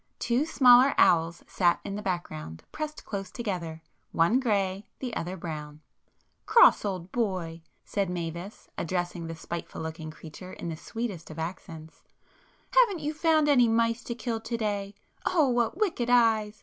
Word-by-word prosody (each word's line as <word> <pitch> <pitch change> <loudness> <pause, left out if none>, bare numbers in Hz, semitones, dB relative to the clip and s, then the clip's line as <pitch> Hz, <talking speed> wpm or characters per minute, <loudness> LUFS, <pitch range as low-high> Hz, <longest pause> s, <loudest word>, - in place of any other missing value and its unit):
Two 245 +5 +1
smaller 255 -2 +6
owls 170 0 +3
sat 175 -2 +2
in 200 - -4
the 210 - -4
background, 80 - -4
pressed 305 -1 -6
close 195 -2 -5
together,—one 175 0 -2
grey, 200 -5 0
the 250 -4 -5
other 180 +3 -4
brown. 150 -3 -7 0.7
"Cross 470 - +6
old 185 -3 -4
boy!" 185 -8 -2 0.2
said 200 -3 -1
Mavis, 175 +3 -6
addressing 175 -1 -2
the 165 - -5
spiteful 170 +1 -6
looking 160 0 -5
[p 155 - -11
235] - - -19
creature 180 +4 -10
in 170 - -6
the 165 - -4
sweetest 205 -1 -5
of 155 - -9
accents—"Haven't 170 - -3
you 300 +1 -2
found 310 -1 +3
any 255 -5 +5
mice 230 +1 +1
to 235 - -4
kill 230 -1 -3
to 230 +1 -4
day? 205 -2 -2 0.3
Oh, 320 -7 +3
what 240 +4 +1
wicked 340 - 0
eyes! 220 -3 +3
200 Hz, 155 wpm, -28 LUFS, 170-240 Hz, 0.7 s, smaller